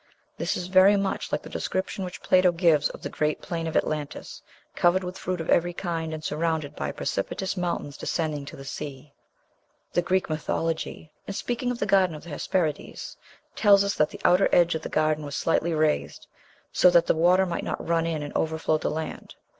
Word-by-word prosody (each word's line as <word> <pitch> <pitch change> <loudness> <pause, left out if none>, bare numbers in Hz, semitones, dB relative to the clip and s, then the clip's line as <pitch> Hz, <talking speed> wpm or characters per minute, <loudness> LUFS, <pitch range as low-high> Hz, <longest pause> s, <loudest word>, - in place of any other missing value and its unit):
This - - -1
is 180 - -4
very 190 +2 +6
much 195 -1 -2
like - - -1
the - - -9
description 190 +1 -3
which 180 -1 -7
Plato 185 -1 +5
gives 165 -4 +3
of - - -11
the - - -2
great 150 0 -1
plain 165 -1 -4
of 160 - 0
Atlantis, 150 -2 -3 0.3
covered 180 +2 +3
with 180 0 -5
fruit 185 -2 -3
of 165 - -2
every 175 +1 +3
kind, 165 -3 -3
and 155 -1 -6
surrounded 155 -1 -1
by - - -3
precipitous 190 - -3
mountains 170 -6 -3
descending 155 -3 -2
to - - -9
the 135 - -10
sea. 140 0 -7 0.8
The 175 - +3
Greek 185 +2 +1
mythology, 160 0 -3 0.2
in 200 - -4
speaking 245 +3 -2
of 245 - -2
the 205 - -1
Garden 190 -4 +3
of 150 - -10
the 170 - -11
Hesperides, 155 +1 -2 0.4
tells 200 -2 +6
us 200 0 0
that 150 0 +2
"the - - -11
outer 180 +2 +5
edge 175 -1 +4
of 160 - -3
the - - -6
garden 155 0 +1
was 145 0 -5
slightly 165 +2 +1
raised, 155 -1 0 0.5
so 180 - +5
that 170 -1 +5
the - - +3
water 180 +4 +4
might 175 - -3
not - - -4
run 165 0 +1
in 155 -3 -2
and 145 - -7
overflow 160 -1 0
the - - -1
land." 160 +1 -5
165 Hz, 200 wpm, -26 LUFS, 155-185 Hz, 0.8 s, very